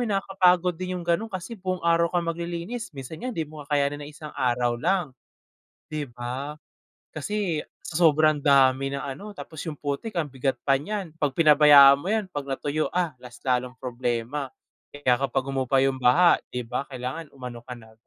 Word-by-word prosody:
'yon 200 Hz, -, +1 dB
nakakapagod 180 Hz, -2 st, +3 dB
din 185 Hz, +1 st, -4 dB
yung 175 Hz, -, -7 dB
gano'n 175 Hz, +7 st, 0 dB
kasi 185 Hz, +5 st, -6 dB
buong-araw 170 Hz, -4 st, +1 dB
kang 175 Hz, -1 st, 0 dB
maglilinis, 170 Hz, +7 st, -4 dB
minsan 135 Hz, +4 st, -8 dB
nga 255 Hz, -, -2 dB
di 165 Hz, -8 st, -2 dB
mo 150 Hz, -1 st, -10 dB
kakayanin 145 Hz, 0 st, 0 dB
ng 145 Hz, -, -9 dB
1 150 Hz, 0 st, -10 dB
araw 120 Hz, -1 st, +1 dB
lang 175 Hz, -5 st, 0 dB, 0.8 s
di 155 Hz, -1 st, -3 dB
ba? 125 Hz, +4 st, -5 dB, 0.6 s
Kasi 175 Hz, 0 st, -2 dB, 0.2 s
sa 170 Hz, -, -7 dB
sobrang 155 Hz, 0 st, +3 dB
dami 135 Hz, -2 st, +4 dB
ng 140 Hz, 0 st, -4 dB
ano 200 Hz, +10 st, -7 dB
tapos 160 Hz, -2 st, -8 dB
yung 150 Hz, -, -5 dB
putik 145 Hz, +10 st, -4 dB
ang 155 Hz, -5 st, -1 dB
bigat 135 Hz, 0 st, -1 dB
pa 135 Hz, -, +4 dB
niyan, 195 Hz, 0 st, -4 dB
pag 145 Hz, -, +2 dB
pinabayaan 145 Hz, -3 st, +8 dB
mo 175 Hz, -, -5 dB
yan 220 Hz, -2 st, +1 dB
pag 145 Hz, -2 st, -5 dB
natuyo, 145 Hz, +3 st, -1 dB
ah, 175 Hz, -3 st, 0 dB
mas 125 Hz, -1 st, -11 dB
lalong 125 Hz, -1 st, 0 dB
problema. 125 Hz, +2 st, -3 dB, 0.4 s
Kaya 130 Hz, -3 st, 0 dB
kapag 135 Hz, -1 st, 0 dB
humupa 135 Hz, -1 st, 0 dB
yung 135 Hz, -1 st, 0 dB
baha 170 Hz, +8 st, +5 dB
di 125 Hz, -1 st, -4 dB
ba 125 Hz, +4 st, -4 dB
kailangan 130 Hz, +5 st, -5 dB
umano 125 Hz, -2 st, -7 dB
ka 125 Hz, +1 st, -8 dB
na, 110 Hz, -2 st, -16 dB
145 Hz, 180 wpm, -25 LUFS, 130-170 Hz, 0.8 s, pinabayaan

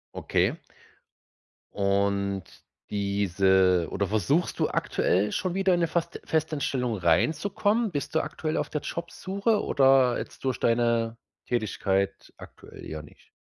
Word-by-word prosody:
Okay. -, -, 0 dB, 1.2 s
Und 100 Hz, -1 st, 0 dB, 0.5 s
diese 95 Hz, -3 st, +2 dB
oder 100 Hz, 0 st, -1 dB
versuchst 110 Hz, -, 0 dB
du -, -, +2 dB
aktuell 100 Hz, +3 st, +1 dB
schon 185 Hz, -2 st, -1 dB
wieder 190 Hz, 0 st, +2 dB
in 175 Hz, -, +1 dB
'ne 170 Hz, -, +2 dB
Fast 170 Hz, +1 st, -2 dB
Festeinstellung 145 Hz, -6 st, -1 dB
reinzukommen? 200 Hz, -, +1 dB
Bist 145 Hz, 0 st, -4 dB
du 160 Hz, -, +4 dB
aktuell 155 Hz, -1 st, -3 dB
auf -, -, -2 dB
der 150 Hz, -, -3 dB
Jobsuche 200 Hz, +5 st, -2 dB
oder 135 Hz, -3 st, +4 dB
jetzt -, -, -8 dB
durch 130 Hz, -2 st, -1 dB
deine 115 Hz, -1 st, +1 dB, 0.3 s
Tätigkeit 100 Hz, -4 st, -1 dB
aktuell -, -, -13 dB
ja 80 Hz, 0 st, -6 dB
nicht? 75 Hz, -, -18 dB
120 Hz, 125 wpm, -27 LUFS, 100-165 Hz, 1.2 s, du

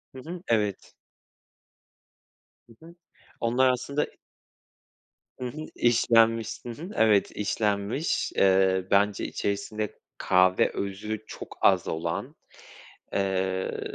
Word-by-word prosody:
Hı -, -, -8 dB
hı, 175 Hz, +2 st, -6 dB
evet. 105 Hz, -4 st, -1 dB, 1.7 s
Hı 115 Hz, +7 st, -18 dB
hı. 170 Hz, +1 st, -14 dB, 0.4 s
Onlar 125 Hz, +3 st, +3 dB
aslında. 140 Hz, +4 st, -1 dB, 1.3 s
Hı 125 Hz, -, -5 dB
hı. 155 Hz, +5 st, -6 dB
İşlenmiş. 115 Hz, -1 st, +3 dB
Hı -, -, -5 dB
hı. 155 Hz, +10 st, -7 dB
Evet 105 Hz, -3 st, +3 dB
işlenmiş. 105 Hz, +6 st, -1 dB
Eee, 95 Hz, -1 st, +3 dB
bence 100 Hz, 0 st, +2 dB
içerisinde 105 Hz, +1 st, -3 dB, 0.2 s
kahve 95 Hz, 0 st, +3 dB
özü 105 Hz, +2 st, -4 dB
çok -, -, -9 dB
az -, -, +4 dB
olan. 85 Hz, +1 st, -3 dB, 0.8 s
Eee, 95 Hz, -1 st, -1 dB
105 Hz, 100 wpm, -27 LUFS, 95-120 Hz, 1.7 s, az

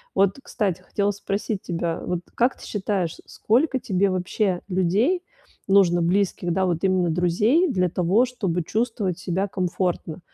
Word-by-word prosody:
Вот, 195 Hz, +4 st, +3 dB
кстати, 190 Hz, -9 st, -2 dB
хотела 200 Hz, +2 st, -1 dB
спросить 200 Hz, +1 st, -3 dB
тебя, 170 Hz, -1 st, -2 dB
вот 180 Hz, -1 st, -1 dB, 0.2 s
как 245 Hz, +2 st, +2 dB
ты -, -, -12 dB
считаешь, 190 Hz, -5 st, -2 dB
сколько 260 Hz, +4 st, +1 dB
тебе 195 Hz, -2 st, +1 dB
вообще 185 Hz, 0 st, -1 dB
людей 205 Hz, -, +1 dB, 0.4 s
нужно 185 Hz, -3 st, +4 dB
близких, 180 Hz, -1 st, 0 dB
да, 190 Hz, +1 st, +1 dB
вот 170 Hz, +1 st, -1 dB
именно 185 Hz, -2 st, +2 dB
друзей 205 Hz, -, +2 dB
для 180 Hz, -6 st, +1 dB
того, 185 Hz, +8 st, +2 dB
чтобы 195 Hz, -9 st, -2 dB
чувствовать 215 Hz, -4 st, -1 dB
себя 185 Hz, +2 st, -1 dB
комфортно? 180 Hz, -3 st, -2 dB
190 Hz, 145 wpm, -24 LUFS, 180-210 Hz, 0.4 s, нужно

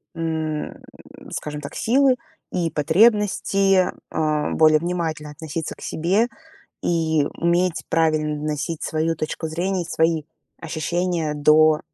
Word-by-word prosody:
м, 160 Hz, -2 st, -3 dB, 0.6 s
скажем 150 Hz, -1 st, -5 dB
так, 145 Hz, +1 st, -8 dB
силы 260 Hz, +2 st, +3 dB, 0.4 s
и 170 Hz, -3 st, -1 dB
потребности, 195 Hz, +2 st, +3 dB, 0.2 s
а, 155 Hz, -1 st, 0 dB
более 155 Hz, -1 st, +5 dB
внимательно 165 Hz, -3 st, -3 dB
относиться 160 Hz, +1 st, -5 dB
к -, -, -18 dB
себе 190 Hz, +8 st, +1 dB, 0.6 s
и 160 Hz, -3 st, +1 dB
уметь 175 Hz, 0 st, +1 dB
правильно 155 Hz, -2 st, +1 dB
доносить 155 Hz, +1 st, -3 dB
свою 160 Hz, +1 st, -1 dB
точку 155 Hz, +1 st, -4 dB
зрения 180 Hz, +3 st, -1 dB
и -, -, -8 dB
свои 160 Hz, -1 st, +1 dB, 0.4 s
ощущения 165 Hz, 0 st, -1 dB
до 155 Hz, +1 st, +5 dB
160 Hz, 115 wpm, -22 LUFS, 155-175 Hz, 0.6 s, более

